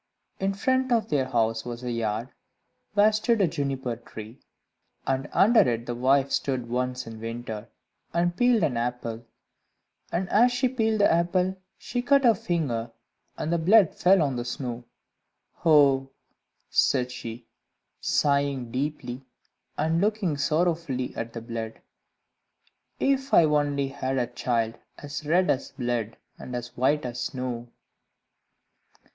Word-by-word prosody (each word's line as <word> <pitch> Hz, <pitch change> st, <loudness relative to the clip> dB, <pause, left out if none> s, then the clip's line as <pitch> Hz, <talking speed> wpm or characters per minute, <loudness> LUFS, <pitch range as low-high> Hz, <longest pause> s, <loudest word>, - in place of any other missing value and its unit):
In 195 Hz, 0 st, 0 dB
front 260 Hz, +4 st, +1 dB
of 230 Hz, -2 st, +2 dB
their 135 Hz, -3 st, +1 dB
house 110 Hz, -1 st, 0 dB
was 120 Hz, 0 st, -7 dB
a 125 Hz, -, -2 dB
yard, 115 Hz, +1 st, -2 dB, 0.7 s
where 210 Hz, +1 st, +6 dB
stood 220 Hz, +2 st, +1 dB
a 195 Hz, -, +4 dB
Juniper 135 Hz, -6 st, -2 dB
tree, 115 Hz, +1 st, -11 dB, 0.7 s
and 135 Hz, +2 st, -1 dB
under 225 Hz, +3 st, +5 dB
it 120 Hz, -2 st, +2 dB
the 120 Hz, -, -3 dB
wife 135 Hz, +3 st, +2 dB
stood 130 Hz, -4 st, -1 dB
once 125 Hz, +1 st, -2 dB
in 115 Hz, -1 st, -9 dB
winter, 115 Hz, -1 st, -6 dB, 0.4 s
and 175 Hz, +1 st, +1 dB
peeled 245 Hz, -2 st, +3 dB
an 130 Hz, -7 st, +1 dB
apple, 120 Hz, -1 st, -3 dB, 0.9 s
and 180 Hz, +2 st, -1 dB
as 240 Hz, +4 st, +5 dB
she 245 Hz, +1 st, +1 dB
peeled 225 Hz, -4 st, 0 dB
the 200 Hz, -, +5 dB
apple 180 Hz, +2 st, +1 dB, 0.2 s
she 245 Hz, +2 st, -3 dB
cut 275 Hz, +2 st, +4 dB
her 235 Hz, -2 st, +6 dB
finger, 145 Hz, -, -2 dB, 0.5 s
and 160 Hz, -, -2 dB
the 170 Hz, -, +2 dB
blood 190 Hz, +2 st, +5 dB
fell 185 Hz, -2 st, +4 dB
on 135 Hz, -4 st, -1 dB
the 120 Hz, -, -2 dB
snow. 120 Hz, -1 st, -5 dB, 0.8 s
"Oh," 140 Hz, -4 st, +5 dB, 0.6 s
said 125 Hz, -2 st, +2 dB
she, 120 Hz, -1 st, -7 dB, 0.5 s
sighing 140 Hz, -4 st, +1 dB
deeply 130 Hz, -1 st, -3 dB, 0.6 s
and 160 Hz, +3 st, +1 dB
looking 205 Hz, -6 st, +1 dB
sorrowfully 155 Hz, -3 st, 0 dB
at 115 Hz, 0 st, -4 dB
the 115 Hz, -, -5 dB
blood, 115 Hz, -1 st, -6 dB, 1.2 s
"if 270 Hz, 0 st, +1 dB
I -, -, +8 dB
only 145 Hz, -2 st, +1 dB
had 135 Hz, -1 st, -3 dB
a 125 Hz, -, +2 dB
child 120 Hz, -1 st, -2 dB, 0.2 s
as 145 Hz, 0 st, -7 dB
red 180 Hz, +4 st, +3 dB
as 135 Hz, -, -2 dB
blood, 120 Hz, -3 st, -3 dB, 0.2 s
and 125 Hz, -, -7 dB
as 120 Hz, 0 st, -6 dB
white 135 Hz, +3 st, +1 dB
as 120 Hz, 0 st, -4 dB
snow!" 125 Hz, -2 st, -4 dB
135 Hz, 140 wpm, -26 LUFS, 120-175 Hz, 1.2 s, I